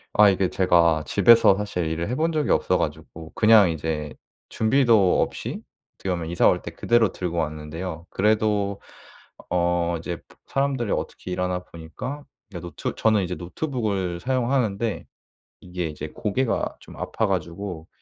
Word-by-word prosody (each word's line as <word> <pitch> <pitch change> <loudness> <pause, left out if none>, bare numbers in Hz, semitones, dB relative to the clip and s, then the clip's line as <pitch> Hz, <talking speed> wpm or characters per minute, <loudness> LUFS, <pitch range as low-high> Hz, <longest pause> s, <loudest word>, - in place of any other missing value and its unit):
아 105 -1 +7
이게 95 -1 +1
제가 85 -4 +3
집에서 105 0 +6
사실 100 -4 -2
일을 80 +1 -2
해 125 - -2
본 165 +4 +1
적이 155 -2 0
없어 90 - +2
가지고 80 0 -5
그냥 110 -5 +6
이제 75 -1 -3 0.4
준비도 110 -5 +3
없이? - - -6 0.3
어떻게 95 - -4
보면 85 -2 -3
이사 85 - +3
올 - - +3
때 - - -6
그대로 115 -4 +2
들고 85 -2 -4
왔는데요. 80 +2 -4
그래도 105 -1 +1 0.7
어 85 -1 +1
이제 85 +1 -5
브 - - -20
사람들이 135 -5 -1
어떻게 90 - -4
일하나 90 0 -2
보니까 125 - -8 0.3
이제 90 - -6
노트 85 +1 -5
저는 110 -3 +2
이제 90 - -3
노트북을 95 - -3
사용하는데 120 -3 0 0.6
이게 90 -2 -4
이제 75 0 -6
고개가 110 +8 -1
좀 - - -13
아파 - - -1
가지고 85 0 -4
90 Hz, 325 characters per minute, -24 LUFS, 85-110 Hz, 0.7 s, 아